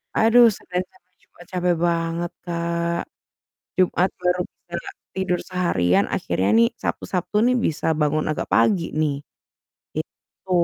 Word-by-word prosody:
aduh 235 +2 +6
sebenernya 180 +1 -4
capek 185 0 -28
juga - - -20
capek 180 -1 +1
banget, 170 0 -1
Kak. 170 0 -1 0.8
Jumat 185 0 +3
baru 180 0 +1
bisa 170 0 -16 0.4
tidur 190 -2 0
seharian, 170 - +2
akhirnya 95 +1 0
nih, 115 0 +6
Sabtu - - -2
Sabtu 185 +2 -2
nih 250 0 +3
bisa 155 - -2
bangun 150 0 +1
agak 155 - -3
pagi 185 -6 +3
nih, 145 -2 0 0.7
gitu. 190 - -9
175 Hz, 130 wpm, -23 LUFS, 165-185 Hz, 0.8 s, aduh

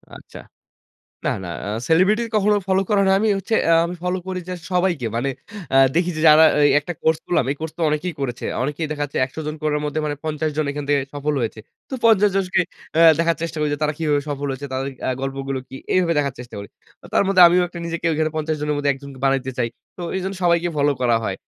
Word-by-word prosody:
আচ্ছা। - - -12 0.9
না, - - +2
না। - - -6 0.2
আ - - -3 0.2
সেলিব্রিটি 195 +8 +4
কখনো 210 0 +3
ফলো 190 0 +3
করা 205 -1 +3
হয় 195 - +2
না। - - +5
আমি 220 - +1
হচ্ছে 220 +4 -1
এ - - +4
আমি 175 +1 -5
ফলো 180 +1 0
করি 185 -1 -3
যে - - -2 0.2
সবাইকে। 175 -8 +1
মানে 135 +4 0 0.5
আ - - +7 0.2
দেখি 175 +1 +2
যে - - -2
যারা 155 +1 +8 0.2
এই 145 - +5
একটা 175 +4 -6
কোর্স 160 0 +2
করলাম। 155 -7 +1
এই - - -2
কোর্স 160 -1 -5
তো - - -5
অনেকেই 160 +3 -2
করেছে। 125 -3 -4 0.2
অনেকেই 150 +3 -2
দেখা 145 -1 -2
যাচ্ছে 145 - -6
১০০ 130 - -16
জন 155 - -3
করার 150 -1 +1
মধ্যে 150 +1 -2
মানে 145 -1 -2
৫০ 155 0 -1
জন 155 - +1
এখান 145 0 -5
থেকে 140 -1 +3
সফল 145 +1 -2
হয়েছে। 110 -1 -3 0.3
তো - - -7
৫০ 210 -2 +5
জনকে 185 -2 +1 0.4
আ - - +4 0.2
দেখার 165 -1 +2
চেষ্টা 165 -1 -4
করি 150 -1 +1
যে, - - -2
তারা 150 0 +1
কিভাবে 150 -3 +1
সফল 145 0 -3
হয়েছে? 140 +2 -6
তাদের 135 +1 -2 0.2
আ - - +1
গল্পগুলো 135 0 -3
কি? 135 - -9 0.2
এইভাবে 175 -2 +2
দেখার 140 -3 -1
চেষ্টা 125 -3 -9
করি। 100 - -8 0.4
ও - - -12
তার - - +4
মধ্যে 190 -2 +4
আমিও 180 +1 +3
একটু 175 - -10
নিজেকে 170 0 -4
ওখানে 155 0 0
৫০ 155 0 -1
জনের 150 0 -1
মধ্যে 145 -1 +2
একজন 140 +1 -11 0.2
বানাইতে 135 -1 +1
চাই। 115 - 0 0.3
তো - - -7
এজন্য 190 +1 -3
সবাইকে 170 0 +2
ফলো 145 0 +3
করা 120 -2 +3
হয়। 95 -2 -2
155 Hz, 235 wpm, -21 LUFS, 140-180 Hz, 0.9 s, যারা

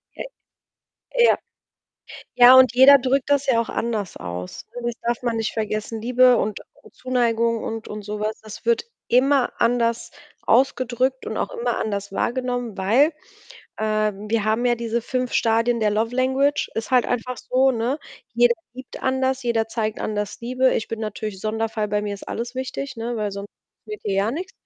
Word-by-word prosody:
Äh, - - -5 1.0
ja. 475 - +5 1.0
Ja, 245 +1 +9
und 260 -3 +6
jeder 270 +2 +9
drückt 265 +2 0
das 285 0 +2
ja 245 -4 +3
auch 230 - -2
anders 220 -5 -3
aus, 90 +1 -7
ne, 245 - -5
das 240 - -2
darf 235 0 -1
man 235 -2 -1
nicht 225 - -2
vergessen, 215 0 -3
Liebe 250 +1 +5
und 210 -1 -2 0.2
und - - -18
Zuneigung 235 -2 0
und 225 0 -5
und 210 0 -6
so 210 +1 -5
was, 215 +1 -3
das 215 -1 -11
wird 465 -1 +2 0.3
immer 265 +1 +3
anders 235 -1 +1 0.3
ausgedrückt 255 +1 +1
und - - -4
auch - - -2
immer 475 -1 -2
anders 200 -2 -3
wahrgenommen, 245 -1 -2
weil, 250 - +3 0.7
ähm, 215 -1 -1
wir 225 -2 +1
haben 220 +3 +1
ja 240 - +3
diese 235 0 -2
5 255 0 -2
Stadien 230 +1 +2
der 215 - +2
love 225 +3 -1
language. 265 +3 +1
Ist 225 -2 -4
halt 250 -2 +4
einfach 245 +1 -2
so, 260 +3 +2
ne? 240 +5 -1 0.4
Jeder 240 0 +4 0.2
liebt 260 +1 -10
anders, 260 0 0
jeder 230 -2 0
zeigt 220 -1 -3
anders 210 -1 -3
Liebe. 255 +2 +1
Ich 220 - -2
bin 225 - -4
natürlich 215 -2 -5
Sonderfall, 220 0 -2
bei 210 0 0
mir 205 -1 -3
ist 200 - -11
alles 240 +2 -4
wichtig, 260 +1 -5
ne, 230 +1 -3
weil 210 -2 -2
sonst 200 +1 -7 0.4
geht 425 0 -7
hier 195 -2 -1
gar 215 - 0
nix. 365 +6 -5
235 Hz, 180 wpm, -22 LUFS, 215-255 Hz, 1.0 s, Ja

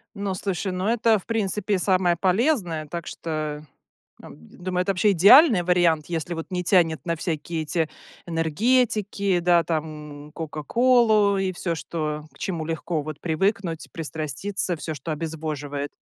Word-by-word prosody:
Ну, 200 -2 -3
слушай, 190 0 -3
ну 185 +3 -2
это 225 -1 +3
в 190 - -14
принципе 210 -2 -1
самое 180 -1 +2
полезное, 185 - +1
так 170 +2 -6
что, 155 -2 -4 0.6
ам, 70 - -12
думаю, 180 - -4
это 195 - 0
вообще 195 +2 +3
идеальный 205 - +7
вариант, 170 -3 +2
если 170 0 -3
вот 165 -1 -6
не 180 -1 -2
тянет 170 -3 +2
на 170 -1 0
всякие 165 0 -3
эти 160 0 -1 0.4
энергетики, 200 +3 +1
да, 175 -1 +4
там 150 -2 -5
кока-колу 210 - +2
и 190 -1 0
всё, 175 -1 -2
что 155 -2 -4
к - - -19
чему 170 -4 -3
легко 165 0 -2
вот 155 0 -7
привыкнуть, 175 0 -1
пристраститься, 165 +4 -3
всё, 155 0 -5
что 150 +2 -6
обезвоживает. 150 -2 -4
175 Hz, 145 wpm, -24 LUFS, 155-195 Hz, 0.6 s, идеальный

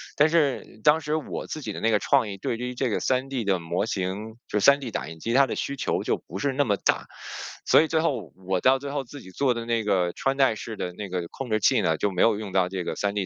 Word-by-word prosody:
但 150 +2 +5
是 150 -8 0
当 150 +2 +5
时 150 +1 -1
我 155 - -4
自 155 - -5
己 105 -5 -5
的 - - -6
那 115 - +1
个 110 - +4
创 110 - +2
意， 100 - -6
对 115 - -2
于 125 +1 -4
这 130 0 0
个 105 - 0
3D 130 -1 -1
的 95 -2 +2
模 85 +4 -1
型 100 +4 -3
就 105 - 0
是 - - +1
3D 140 -4 -3
打 - - -3
印 80 - -9
机， 115 +6 -2
它 135 +1 +5
的 - - -3
需 140 - -3
求 135 - -1
就 - - 0
不 95 - -6
是 140 +5 0
那 145 +2 +2
么 105 -4 +1
大。 - - +1 0.6
所 - - +6
以 160 - +1
最 160 0 +1
后 130 - -1 0.2
我 95 -1 +1
到 130 +1 +5
最 140 +1 -6
后 140 -1 -2
自 135 +3 -11
己 95 - -13
做 130 +5 +1
的 115 - -4
那 115 -1 0
个 90 -4 +1
穿 135 0 -1
戴 135 -5 +4
式 110 0 -6
的 90 - -3
那 100 0 -7
个 90 -2 -3
控 135 -3 -7
制 110 - +2
器 - - +3
呢， - - +1
就 100 - 0
没 90 - -1
有 110 -3 +4
用 105 -3 -6
到 95 -1 +2
这 95 -2 -3
个 - - -3
3D 100 -1 -1
115 Hz, 310 characters per minute, -25 LUFS, 100-135 Hz, 0.6 s, 所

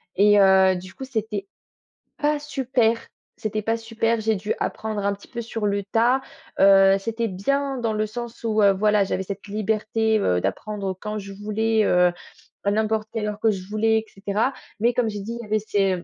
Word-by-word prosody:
et 205 +1 +5
heu, 190 -1 +6
du 185 +1 -8
coup 265 - -7
c'était 220 -5 -3 0.7
pas 300 0 +1
super, 255 -5 +1 0.7
pas 225 0 +2
super. 225 0 -1
J'ai 220 0 +1
dû 205 +2 -2
apprendre 215 -2 -3
un 200 - +2
petit 200 - -16
peu 235 - -5
sur 225 -2 -3
le 200 0 0
tas, 235 +6 +2 0.4
heu, 195 0 +7
c'était 230 +3 -2
bien 275 +9 -1
dans 230 -2 -1
le 215 0 0
sens 235 +2 -7
où, 220 -1 +1
heu, 200 -1 +6
voilà, 210 +1 +3
j'avais 190 - -2
cette 200 +1 -7
liberté, 220 +1 0
heu, 90 - +1
d'apprendre 195 - -3
quand 215 0 -4
je 200 -1 -8
voulais, 215 +2 0
heu, 180 -2 +4 0.6
à 200 - +3
n'importe 215 +1 0
quelle 220 -2 -2
heure 210 0 -4
que 225 - +4
je 190 -2 -6
voulais 220 +1 +2
et 220 - -9
cetera, 205 +6 -1 0.3
mais 235 +3 +3
comme 235 -2 +1
j'ai 205 -1 -5
dit, 230 +4 -5
il - - -6
y - - -9
avait 215 +1 +2
ces 195 -4 0
215 Hz, 200 wpm, -23 LUFS, 200-225 Hz, 0.7 s, heu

